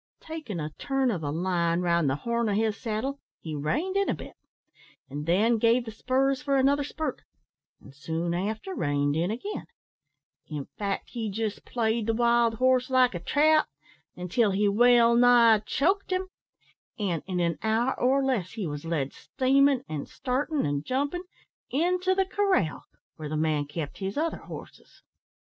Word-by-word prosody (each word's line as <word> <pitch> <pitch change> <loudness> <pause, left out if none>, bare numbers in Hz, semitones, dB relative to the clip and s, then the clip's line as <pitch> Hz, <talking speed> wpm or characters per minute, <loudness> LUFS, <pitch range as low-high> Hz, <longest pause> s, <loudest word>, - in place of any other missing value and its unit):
Takin' 310 - -6
a 155 0 -4
turn 270 -2 +1
o' 190 - -2
the 145 -2 -3
line 170 +1 0
round 170 -4 +2
the 135 - 0
horn 235 +6 -1
of 200 - +1
his 215 0 +1
saddle, 240 +5 -3 0.2
he 160 - -6
reined 300 - -1
in 395 0 +2
a - - +1
bit, - - -10 0.8
and 145 +2 -5
then 220 +7 +3
gave 235 +2 +3
the 225 - -6
spurs 265 +4 0
for 275 -2 +1
another 280 +2 +3
spurt, 300 0 -4 0.6
and 135 - -15
soon 165 +4 -3
after 215 - -3
reined 145 - 0
in 170 +3 0
again 255 - -5 0.8
in 150 -3 -5
fact, 200 -2 -3
he 225 -3 -3
jist 215 +1 -3
played 225 -2 -1
the 225 - +1
wild 235 -1 +3
horse 255 +1 +2
like 255 -2 +4
a 175 - -4
trout, 305 - +3 0.5
until 180 +5 +1
he 200 +2 +1
well 235 +2 +5
nigh 235 -2 +6
choked 380 +8 +1
him; 370 0 -1 0.7
an', 185 -7 -1
in 185 -2 -2
an 170 -2 0
hour, 225 +4 +1
or 270 +2 +3
less, 220 -10 -1
he 220 -4 -4
was 145 -2 -5
led 160 -5 -2
steamin', 270 0 +2
and 150 -2 -5
startin', 275 +3 -1
and 145 0 -1
jumpin', 285 - -2 0.4
into 360 +6 +1
the 385 0 +2
corral, 380 - 0 0.3
where 155 -2 -6
the 155 - -2
man 155 -2 +1
kept 145 0 -6
his 195 +3 -4
other 325 +2 0
horses." - - -12
225 Hz, 170 wpm, -27 LUFS, 170-270 Hz, 0.8 s, nigh